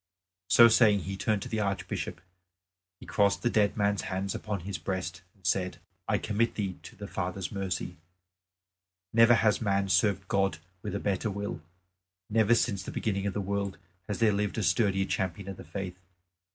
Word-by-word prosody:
So 115 Hz, +5 st, +8 dB
saying 110 Hz, -3 st, +5 dB
he 95 Hz, +2 st, -4 dB
turned 105 Hz, +1 st, 0 dB
to -, -, -6 dB
the 110 Hz, -, -2 dB
Archbishop; 100 Hz, -4 st, -3 dB, 0.8 s
he -, -, -11 dB
crossed 100 Hz, -1 st, +2 dB
the 120 Hz, -, +2 dB
dead 105 Hz, -1 st, +2 dB
man's 100 Hz, -1 st, +2 dB
hands 95 Hz, +1 st, -2 dB
upon 105 Hz, -4 st, -4 dB
his 95 Hz, +2 st, -5 dB
breast 95 Hz, -1 st, -3 dB
and 95 Hz, -3 st, -24 dB
said, 90 Hz, +1 st, 0 dB, 0.3 s
"I -, -, +2 dB
commit 115 Hz, +2 st, 0 dB
thee 95 Hz, -4 st, -3 dB
to -, -, -12 dB
the -, -, -8 dB
Father's 90 Hz, +1 st, -3 dB
mercy. 95 Hz, -6 st, -3 dB, 1.2 s
Never 115 Hz, +1 st, +7 dB
has 110 Hz, -1 st, +2 dB
man 100 Hz, -2 st, +1 dB
served 100 Hz, -1 st, +2 dB
God 95 Hz, -6 st, +1 dB, 0.2 s
with 100 Hz, -1 st, -4 dB
a -, -, -1 dB
better 100 Hz, +2 st, -1 dB
will, 100 Hz, -7 st, -4 dB, 0.7 s
never 110 Hz, +1 st, +4 dB
since 100 Hz, -4 st, +1 dB
the -, -, -7 dB
beginning 100 Hz, -2 st, -1 dB
of 100 Hz, -, -3 dB
the 105 Hz, -, 0 dB
world 100 Hz, 0 st, -2 dB, 0.3 s
has 105 Hz, -, -2 dB
there 110 Hz, -2 st, +3 dB
lived 105 Hz, +1 st, -1 dB
a 110 Hz, -, 0 dB
sturdier 95 Hz, -2 st, +2 dB
champion 95 Hz, 0 st, -2 dB
of 95 Hz, -2 st, -6 dB
the -, -, -9 dB
faith. 95 Hz, -2 st, -6 dB
100 Hz, 180 wpm, -29 LUFS, 95-105 Hz, 1.2 s, So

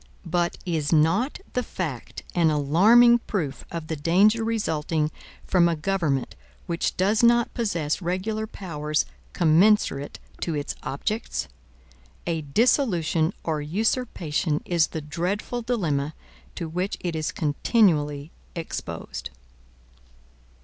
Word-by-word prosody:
But 175 Hz, 0 st, 0 dB
is 160 Hz, -5 st, -1 dB
not 170 Hz, -, +2 dB
the 250 Hz, -, +1 dB
fact 155 Hz, -, -5 dB
an 170 Hz, -2 st, +3 dB
alarming 205 Hz, +12 st, +6 dB
proof 160 Hz, -10 st, -2 dB
of 165 Hz, -2 st, -5 dB
the 160 Hz, -, -3 dB
danger 195 Hz, +9 st, +3 dB
resulting 160 Hz, -8 st, 0 dB, 0.3 s
from 175 Hz, -2 st, +4 dB
a 170 Hz, -, 0 dB
government 155 Hz, -6 st, -1 dB, 0.3 s
which 170 Hz, 0 st, -2 dB
does 200 Hz, +4 st, +2 dB
not 235 Hz, 0 st, +4 dB
possess 170 Hz, -9 st, -1 dB
regular 200 Hz, +5 st, -2 dB
powers 155 Hz, -7 st, -2 dB, 0.3 s
commensurate 170 Hz, -4 st, +3 dB, 0.2 s
to 165 Hz, -, -2 dB
its 145 Hz, -1 st, -3 dB
objects? 215 Hz, -, -3 dB, 0.8 s
A 165 Hz, -2 st, -1 dB
dissolution 170 Hz, -, +2 dB
or 155 Hz, -2 st, -1 dB
usurpation 170 Hz, -, -1 dB
is 170 Hz, -3 st, +2 dB
the 160 Hz, -, -5 dB
dreadful 180 Hz, +10 st, -3 dB
dilemma 160 Hz, -, -1 dB, 0.4 s
to 170 Hz, -, -4 dB
which 180 Hz, +5 st, -2 dB
it 175 Hz, -2 st, -2 dB
is 155 Hz, -1 st, -1 dB
continually 150 Hz, -2 st, +1 dB, 0.2 s
exposed. 165 Hz, -, -5 dB
170 Hz, 115 wpm, -25 LUFS, 150-210 Hz, 0.8 s, alarming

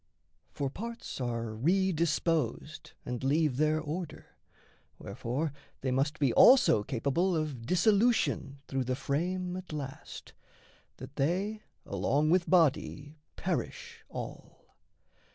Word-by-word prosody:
For 140 Hz, -2 st, -3 dB
parts 230 Hz, -, -6 dB
are 115 Hz, -2 st, -2 dB
re 185 Hz, -, +2 dB
disposed 155 Hz, -2 st, -1 dB
and 125 Hz, +1 st, -4 dB
leave 145 Hz, -1 st, +2 dB
their 155 Hz, +1 st, +2 dB
order; 160 Hz, +3 st, -6 dB, 0.6 s
Wherefore 140 Hz, +6 st, -3 dB, 0.3 s
they 130 Hz, -, -1 dB
must 140 Hz, +6 st, 0 dB
be 140 Hz, -5 st, +2 dB
also 255 Hz, -, +7 dB
capable 140 Hz, -, 0 dB
Of 140 Hz, -7 st, -4 dB
dissolution 195 Hz, -, +2 dB
through 135 Hz, -1 st, -1 dB
the 130 Hz, +1 st, -1 dB
frame 180 Hz, +7 st, -2 dB
at 185 Hz, -1 st, -7 dB
last, 140 Hz, -3 st, -7 dB, 0.6 s
That -, -, -10 dB
they 195 Hz, +9 st, 0 dB, 0.2 s
along 150 Hz, +3 st, +1 dB
with 180 Hz, 0 st, +2 dB
body 155 Hz, -3 st, +1 dB, 0.2 s
perish -, -, -4 dB
all. -, -, -9 dB
155 Hz, 115 wpm, -30 LUFS, 135-180 Hz, 0.6 s, also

